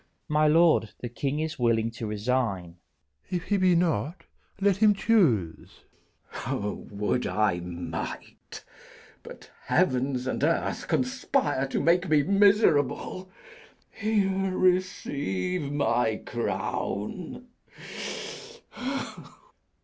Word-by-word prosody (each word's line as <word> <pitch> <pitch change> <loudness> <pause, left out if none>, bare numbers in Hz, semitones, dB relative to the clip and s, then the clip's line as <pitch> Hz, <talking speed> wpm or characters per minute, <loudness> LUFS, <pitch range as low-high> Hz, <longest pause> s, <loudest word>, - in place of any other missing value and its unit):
_ - - -36 0.2
My 150 0 +3
lord, 160 -8 +4
the 120 - -4
king 140 +5 -2
is 155 -2 -3
willing 115 -1 +2
to 115 -1 -6
resign. 105 -5 -1 0.4
Bish. - - -42
of - - -30
Win. 180 - +1
If 170 - -6
he 205 - +3
be 185 -2 +4
not, 165 - 0 0.4
let 195 -1 +3
him 210 0 +5
choose. 135 - +1 0.5
K. - - -6
Edw. - - 0
O, 105 - -6
would 105 +4 -1
I 105 -5 +1
might! 85 -1 -7 0.6
but - - -12
heavens 130 -6 +1
and 130 - -2
earth 165 +2 0
conspire 255 - 0
To - - -1
make 175 +2 +2
me 150 -2 +4
miserable. 195 - +3 0.6
Here, 195 -3 0
receive 180 - 0
my 120 -6 +1
crown. 120 - -3
150 Hz, 115 wpm, -27 LUFS, 115-185 Hz, 0.6 s, him